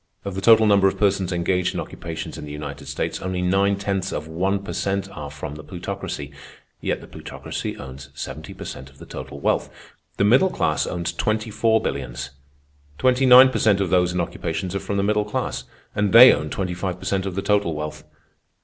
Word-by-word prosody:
Of 100 - -3
the 95 - -4
total 110 0 +6
number 100 -2 +5
of 95 - -1
persons 100 -3 +1
engaged 90 +1 0
in - - -1
occupations 80 -1 -6
in - - -8
the 75 - -7
United 75 +1 -7
States, - - -3
only 95 -1 -2
nine 100 +2 +2
tenths 100 -1 -2
of 75 - -4
one 95 +5 -1
per 100 - -5
cent 100 0 -1
are 75 -6 -7
from 75 0 -7
the 75 +1 -9
Plutocracy, 90 -5 -6 0.5
yet - - -1
the - - -12
Plutocracy - - -6
owns 70 +1 -9
seventy 75 +3 -7
per - - -8
cent 65 - -8
of 70 - -21
the - - -11
total - - -8
wealth. - - 0 0.5
The - - +2
middle 125 - +5
class 75 - 0
owns 85 -1 -3
twenty 110 +5 -1
four 110 +1 +3
billions. 65 0 -4 0.7
Twenty 130 +1 +3
nine 130 +1 +9
per - - -2
cent 105 -3 +3
of 95 -3 -1
those 90 -1 +3
in 90 - -2
occupations 90 +1 -3
are 100 - -1
from 100 +1 -3
the 100 - +1
middle 105 +1 +2
class, 105 -10 -3 0.3
and 105 -1 +1
they 125 +3 +11
own 75 - -2
twenty 90 0 -2
five 90 0 -3
per - - -11
cent 95 0 0
of 95 - -4
the 95 - -2
total 100 -6 +1
wealth. 75 0 -5
95 Hz, 215 wpm, -23 LUFS, 80-100 Hz, 0.7 s, they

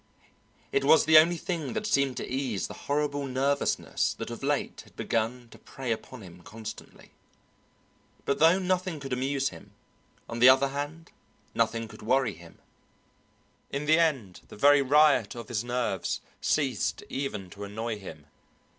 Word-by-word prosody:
It 415 0 +1
was 160 - +5
the 155 0 +9
only 170 +2 +3
thing 165 -4 -4
that 215 -1 -3
seemed 140 - +1
to - - -4
ease 130 -6 -2
the - - -7 0.2
horrible 145 -1 0
nervousness 135 +2 0
that - - -6
of - - -7
late - - -1
had - - -21
begun 115 +2 -2
to - - -15
prey 130 -3 -6
upon 115 +1 -5
him 90 -1 -13
constantly. 110 +4 -10 1.1
But 140 - 0
though 165 +3 +6
nothing 185 -3 -1
could 135 -2 -5
amuse 135 +2 0
him, - - -14 0.5
on 115 - -5
the 125 +2 +9
other 135 +1 +5
hand 145 +4 -6 0.4
nothing 115 0 0
could 110 0 -13
worry 125 0 +1
him; 85 0 -15 1.1
in 140 +2 -3
the 160 +2 +4
end 135 - 0
the - - -12
very 145 +4 +6
riot 140 -5 +4
of 120 - -8
his 115 -2 -1
nerves 120 -6 -2 0.2
ceased - - 0
even 105 -10 -4
to 100 - -9
annoy 110 +2 -4
him. 80 -6 -10
135 Hz, 160 wpm, -28 LUFS, 115-145 Hz, 1.1 s, the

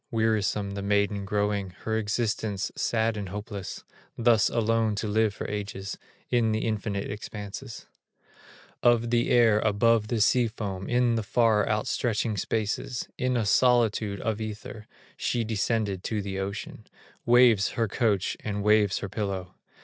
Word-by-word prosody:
Wearisome 110 -3 0
the 100 0 -4
maiden 100 0 0
growing, 100 -1 -1
Her 110 - -2
existence 105 -2 -1
sad 115 -1 0
and 100 -3 -5
hopeless, 100 -1 -6 0.3
Thus 115 -3 +4
alone 115 -1 +1
to 105 +2 -2
live 110 +1 +2
for - - -5
ages 100 -2 -5 0.4
In 115 -3 +2
the 110 - -1
infinite 105 -2 -2
expanses 105 +3 -7 1.0
Of 120 -1 +3
the 120 0 +2
air 115 -3 +5
above 110 +1 +2
the 115 +1 -1
sea 120 +3 +4
foam, 100 -4 -5
In 120 -1 +3
the - - 0
far 110 -1 +2
outstretching 110 +1 0
spaces, 110 +5 -2
In 125 -1 +1
a 115 - 0
solitude 110 -3 +2
of 110 -1 -2
ether, 110 +1 -7 0.3
She 120 - 0
descended 105 -3 -1
to 110 - -1
the 95 -1 -4
ocean, 100 +2 -6 0.4
Waves 120 -5 +6
her 115 -1 0
coach, 105 -3 0
and 105 -1 -3
waves 105 -2 +3
her - - -4
pillow. 95 -3 -4
110 Hz, 145 wpm, -27 LUFS, 100-115 Hz, 1.0 s, Waves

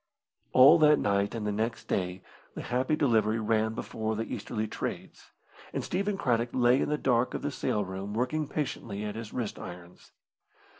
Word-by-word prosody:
All 140 +6 +8
that 150 -1 +6
night 100 -1 0
and 110 -2 -3
the 105 - 0
next 110 +3 -2
day 90 -1 -2 0.3
the - - -5
Happy 130 +5 0
Delivery 115 -7 +2
ran 110 0 +1
before 110 -1 -3
the 110 - -1
easterly 110 -1 -4
trades, - - -6 0.4
and - - -2
Stephen 200 +2 -1
Craddock 120 -6 +1
lay 125 +1 +4
in - - 0
the 150 - +1
dark 125 -3 +1
of - - -4
the 145 - -1
sail 105 -6 -1
room 95 +2 -5
working 140 +6 -1
patiently 115 -8 -4
at 105 - -3
his 110 0 -7
wrist 120 -4 -4
irons. 90 0 -11
115 Hz, 180 wpm, -29 LUFS, 105-130 Hz, 0.4 s, All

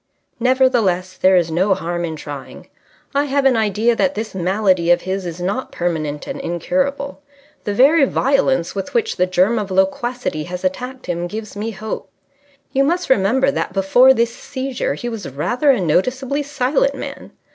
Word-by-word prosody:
"Nevertheless, 230 -8 +2
there 185 0 +4
is 170 -2 +2
no 190 +4 +2
harm 175 -1 -3
in 160 -1 -4
trying. 145 -3 -9 0.5
I 285 +1 +2
have 280 0 0
an 265 -2 +5
idea 220 +2 +2
that 280 +4 +1
this 220 0 -4
malady 185 -1 +1
of 175 0 +5
his 190 0 -3
is 170 0 -6
not 200 +9 -3
permanent 155 -4 -2
and - - -5
incurable. 275 - -2 0.4
The 205 - -1
very 280 +5 +5
violence 270 -8 +1
with 195 - -5
which 455 -1 0
the 180 - +2
germ 185 +5 +2
of 205 -2 -4
loquacity 190 -2 -1
has 180 +1 -6
attacked 250 +8 -3
him 175 0 -2
gives 215 +2 -7
me 210 +2 -3
hope. 215 0 -6 0.6
You 275 0 +3
must 345 +2 0
remember 260 +5 +3
that 265 - -3
before 200 +7 +5
this 235 -2 +1
seizure 265 -1 -3
he 240 - -6
was 225 -3 -5
rather 240 - 0
a 260 -5 +5
noticeably 255 - 0
silent 290 - 0
man. - - -8
215 Hz, 170 wpm, -19 LUFS, 180-265 Hz, 0.6 s, an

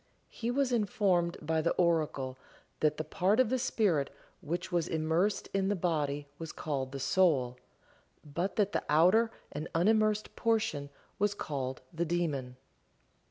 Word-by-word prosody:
He 230 - -4
was 265 +1 +1
informed 190 -6 +1
by 160 +1 +1
the 170 - +1
oracle 155 -7 +1 0.4
that 150 -1 +2
the 155 - -2
part 190 - +1
of 255 -4 +4
the 260 - +2
spirit 190 - +1 0.3
which 175 +4 -3
was 170 -2 +1
immersed 160 +6 +1
in 195 -1 +1
the 205 - +1
body 150 -5 -1
was 165 -1 -5
called 135 -4 -3
the 135 - -5
"soul," 135 -5 +2 0.7
but 170 +6 -2
that 205 -2 +2
the - - -1
outer 185 +9 +5 0.2
and 150 +2 -4
unimmersed 215 +4 +2
portion 210 -11 0 0.3
was 205 0 +2
called 135 -7 -4
the 165 +1 0
"daemon." 150 -7 -1
170 Hz, 150 wpm, -31 LUFS, 150-205 Hz, 0.7 s, outer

